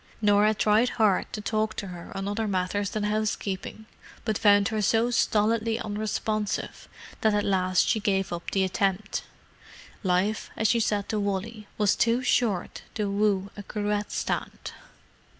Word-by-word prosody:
Norah 210 Hz, 0 st, +4 dB
tried 215 Hz, +4 st, +3 dB
hard 215 Hz, -5 st, +2 dB
to 215 Hz, -, -5 dB
talk 215 Hz, +1 st, -1 dB
to 200 Hz, -, -5 dB
her 175 Hz, -1 st, -9 dB
on 195 Hz, 0 st, -3 dB
other 215 Hz, +2 st, -1 dB
matters 195 Hz, +1 st, -1 dB
than 215 Hz, 0 st, -3 dB
housekeeping, 210 Hz, -1 st, -2 dB, 0.4 s
but 220 Hz, -2 st, 0 dB
found 205 Hz, -1 st, +4 dB
her 220 Hz, -1 st, -1 dB
so 225 Hz, +4 st, +2 dB
stolidly 225 Hz, 0 st, +2 dB
unresponsive 215 Hz, -1 st, -3 dB, 0.3 s
that 215 Hz, -1 st, +3 dB
at 205 Hz, -, +1 dB
last 185 Hz, -2 st, +2 dB
she 220 Hz, -, +2 dB
gave 195 Hz, -3 st, 0 dB
up 170 Hz, 0 st, -5 dB
the 195 Hz, -, +1 dB
attempt. 195 Hz, +2 st, -1 dB, 0.8 s
Life, 190 Hz, +3 st, 0 dB
as 220 Hz, -, +2 dB
she 235 Hz, -, +3 dB
said 205 Hz, -2 st, 0 dB
to 215 Hz, -, 0 dB
Wally, 205 Hz, +2 st, -3 dB
was 210 Hz, -2 st, +3 dB
too 235 Hz, +2 st, +2 dB
short 215 Hz, -8 st, 0 dB
to 210 Hz, -2 st, -1 dB
woo 200 Hz, -1 st, +1 dB
a 205 Hz, -, -7 dB
cruet 210 Hz, 0 st, -2 dB
stand! -, -, -3 dB
210 Hz, 155 wpm, -27 LUFS, 200-220 Hz, 0.8 s, Norah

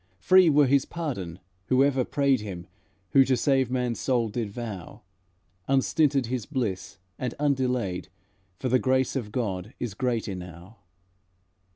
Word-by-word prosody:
Free 185 Hz, -, +5 dB
were 145 Hz, -1 st, +5 dB
his 135 Hz, +1 st, +3 dB
pardon 100 Hz, -, -5 dB, 0.3 s
whoever 135 Hz, 0 st, +3 dB
prayed 140 Hz, -2 st, +1 dB
Him 90 Hz, -4 st, -7 dB, 0.5 s
who 135 Hz, -, +7 dB
to 130 Hz, -1 st, +1 dB
save 135 Hz, -3 st, +2 dB
man's 125 Hz, -2 st, -1 dB
soul 120 Hz, -4 st, +1 dB
did 110 Hz, 0 st, -3 dB
vow, 105 Hz, -5 st, -7 dB, 0.6 s
Unstinted 135 Hz, 0 st, +2 dB
his 120 Hz, -1 st, -3 dB
bliss, 115 Hz, -, -3 dB, 0.2 s
and 125 Hz, -2 st, -3 dB
undelayed, 125 Hz, -9 st, 0 dB, 0.5 s
For 130 Hz, -, -3 dB
the 130 Hz, +1 st, +3 dB
grace 130 Hz, +1 st, +1 dB
of 115 Hz, -6 st, -3 dB
God 105 Hz, -3 st, -3 dB
is 120 Hz, -5 st, -3 dB
great 120 Hz, 0 st, -1 dB
enow." 90 Hz, +1 st, -8 dB
125 Hz, 140 wpm, -26 LUFS, 105-135 Hz, 0.6 s, who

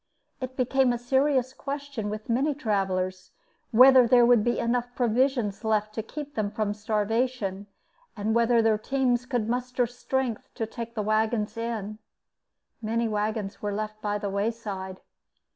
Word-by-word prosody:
It 255 Hz, 0 st, -6 dB
became 260 Hz, 0 st, +2 dB
a 240 Hz, -, 0 dB
serious 260 Hz, +1 st, +1 dB
question 280 Hz, -6 st, -5 dB
with 215 Hz, +1 st, -6 dB
many 270 Hz, +5 st, +1 dB
travelers 185 Hz, -7 st, -1 dB, 0.4 s
whether 255 Hz, +1 st, +7 dB
there 240 Hz, 0 st, +6 dB
would 240 Hz, -3 st, +5 dB
be 240 Hz, +1 st, +1 dB
enough 245 Hz, +1 st, -1 dB
provisions 240 Hz, -3 st, +1 dB
left 215 Hz, -1 st, 0 dB
to 220 Hz, -, -2 dB
keep 290 Hz, +6 st, -8 dB
them 215 Hz, -2 st, -1 dB
from 210 Hz, 0 st, -2 dB
starvation 210 Hz, -1 st, -1 dB, 0.5 s
and 210 Hz, +2 st, 0 dB
whether 235 Hz, 0 st, +3 dB
their 220 Hz, -1 st, +3 dB
teams 250 Hz, 0 st, 0 dB
could 240 Hz, -4 st, -1 dB
muster 250 Hz, +1 st, 0 dB
strength 245 Hz, 0 st, -3 dB
to 225 Hz, -, -2 dB
take 230 Hz, +1 st, -7 dB
the 215 Hz, -, -1 dB
wagons 215 Hz, 0 st, 0 dB
in. 220 Hz, -2 st, -4 dB, 0.8 s
Many 230 Hz, +1 st, 0 dB
wagons 210 Hz, -1 st, -2 dB
were 205 Hz, -1 st, -2 dB
left 215 Hz, 0 st, -5 dB
by 205 Hz, -1 st, -1 dB
the 205 Hz, -1 st, -4 dB
wayside. 200 Hz, -3 st, -3 dB
230 Hz, 150 wpm, -27 LUFS, 210-250 Hz, 0.8 s, whether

